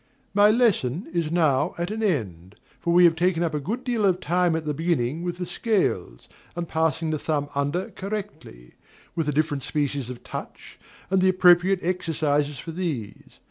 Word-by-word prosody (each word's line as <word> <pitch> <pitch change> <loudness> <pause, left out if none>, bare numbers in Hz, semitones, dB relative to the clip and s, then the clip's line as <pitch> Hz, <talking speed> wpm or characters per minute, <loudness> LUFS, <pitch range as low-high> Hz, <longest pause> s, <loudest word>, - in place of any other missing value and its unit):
My 205 +1 +6
lesson 210 - +2
is 170 -3 0
now 155 -2 +2
at 175 +3 -2
an 220 +1 -3
end; 100 - -2 0.2
for 170 - -1
we 175 +1 +6
have 165 -1 +5
taken 175 0 +1
up 165 -2 -1
a 150 - 0
good 220 - -4
deal 240 -4 -1
of 185 -2 +3
time 175 -1 +1
at 160 -1 -3
the 150 - -1
beginning 160 -2 -1
with 175 0 -3
the 180 - -3
scales, 170 - -1 0.3
and 175 -1 -3
passing 160 0 0
the 155 - -1
thumb 145 -2 -1
under 145 +6 -1
correctly, 190 - -7 0.4
with 165 -3 -1
the - - +2
different 150 -1 0
species 145 -2 -2
of 125 -1 -8
touch, - - -9 0.3
and 190 -1 +3
the 190 - +4
appropriate 185 0 +5
exercises 150 -5 0
for 165 - -7
these. 155 - -5
165 Hz, 180 wpm, -25 LUFS, 145-185 Hz, 0.4 s, My